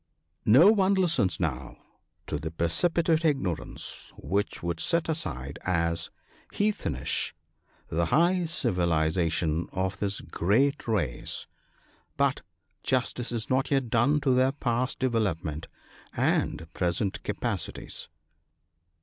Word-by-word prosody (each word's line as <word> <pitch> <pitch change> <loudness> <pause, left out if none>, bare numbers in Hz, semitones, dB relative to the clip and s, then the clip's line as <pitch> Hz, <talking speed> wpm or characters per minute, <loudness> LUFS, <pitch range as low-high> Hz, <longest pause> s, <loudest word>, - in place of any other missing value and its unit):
No 145 - +8
one 200 -2 +3
listens 170 - +2
now 70 -7 -3 0.5
to 75 - -3
the 80 +2 -4
preci 85 - +1
pitate 165 -1 +2
ignorance 135 - -2
which 100 +4 -2
would 85 -1 -2
set 170 -1 +2
aside 70 - -3
as 85 -2 0 0.2
" - - -28
heathenish 200 - 0 0.3
" - - -36
the 85 +1 0
high 175 - +3
civilization 85 - +1
of 95 +1 -2
this 100 0 -1
great 130 - +1
race; 85 - -1 0.7
but - - +2 0.4
justice 125 -1 0
is 115 -2 -2
not 130 +1 +1
yet 135 -5 0
done 135 +6 +3
to 135 -2 +3
their 130 +1 +3
past 125 -2 -1
development 90 - -1 0.5
and 80 - +1
present 90 +2 -1
capa - - -2
cities. - - -7
105 Hz, 120 wpm, -28 LUFS, 85-140 Hz, 0.7 s, No